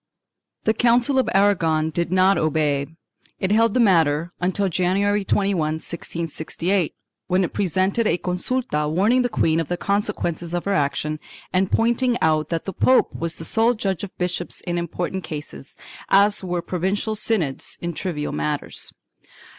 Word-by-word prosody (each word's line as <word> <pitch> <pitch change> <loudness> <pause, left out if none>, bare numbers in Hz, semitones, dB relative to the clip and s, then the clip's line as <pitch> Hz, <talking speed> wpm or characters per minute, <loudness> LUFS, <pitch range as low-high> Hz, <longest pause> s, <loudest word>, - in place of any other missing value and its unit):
The 220 - +2
Council 245 +4 +3
of 260 - +1
Aragon 165 -6 +2
did 170 +2 -1
not 185 +1 +4
obey. 150 -3 +1 0.5
It 190 - -1
held 225 0 +3
the - - +3
matter 170 -6 +3
until 190 +2 +1
January 195 +3 +1
21, 195 -1 +1
1668, 165 +3 -2 0.3
when 185 +1 +2
it 175 - -3
presented 195 +4 +1
a 170 - +2
consulta 180 - -2
warning 205 +10 +3
the 245 - 0
queen 165 -7 +1
of 165 - -2
the 175 - -2
consequences 175 -4 -1
of 175 - -3
her 200 - +1
action 150 -1 -1 0.3
and 185 +1 +1
pointing 240 +2 +2
out 155 -1 +1
that 165 -1 -2
the 195 - -4
pope 255 +8 +3
was 165 0 -2
the 165 - -5
sole 230 +7 +3
judge 195 -4 -2
of 200 - -8
bishops 180 -1 -3
in 175 -1 -2
important 175 +2 -3
cases, 145 - -8 0.3
as 200 +1 +4
were 175 -2 -2
provincial 190 +4 -1
synods 200 -10 -1
in 170 0 -4
trivial 150 -3 -3
matters. 75 0 -2
180 Hz, 155 wpm, -22 LUFS, 160-205 Hz, 0.5 s, not